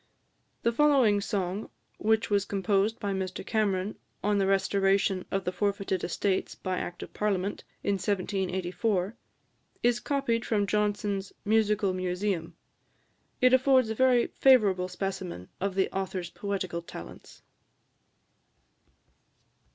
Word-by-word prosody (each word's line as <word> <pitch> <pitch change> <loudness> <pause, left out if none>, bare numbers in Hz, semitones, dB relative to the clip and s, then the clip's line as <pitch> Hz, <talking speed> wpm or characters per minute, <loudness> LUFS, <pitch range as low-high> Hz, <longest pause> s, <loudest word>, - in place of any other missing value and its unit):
The 235 - +3
following 250 -6 +4
song, 195 -1 -2 0.3
which 220 0 +1
was 200 -1 +3
composed 200 +2 0
by 200 -2 -2
Mr 190 -1 -4
Cameron, 205 -3 0 0.2
on 205 0 +2
the 195 - +2
restoration 195 0 +2
of 195 0 -1
the 180 - 0
forfeited 195 -1 -1
estates 190 +2 -1
by 185 -1 -3
Act 175 - -5
of - - -11
Parliament, 200 -1 -1 0.2
in 200 -1 +1
1784, 190 +1 -1 0.7
is 240 0 +3
copied 270 -5 0
from 210 -4 +1
Johnson's 205 -1 -1
"Musical 210 -2 +2
Museum." 185 -1 -2 0.9
It 255 0 +5
affords 260 -3 +4
a - - 0
very 255 -1 +4
favourable 205 -9 +4
specimen 185 - -5
of 195 0 -2
the 195 - +2
author's 185 -2 -3
poetical 190 -4 -3
talents. 170 - -11
200 Hz, 120 wpm, -28 LUFS, 185-215 Hz, 0.9 s, It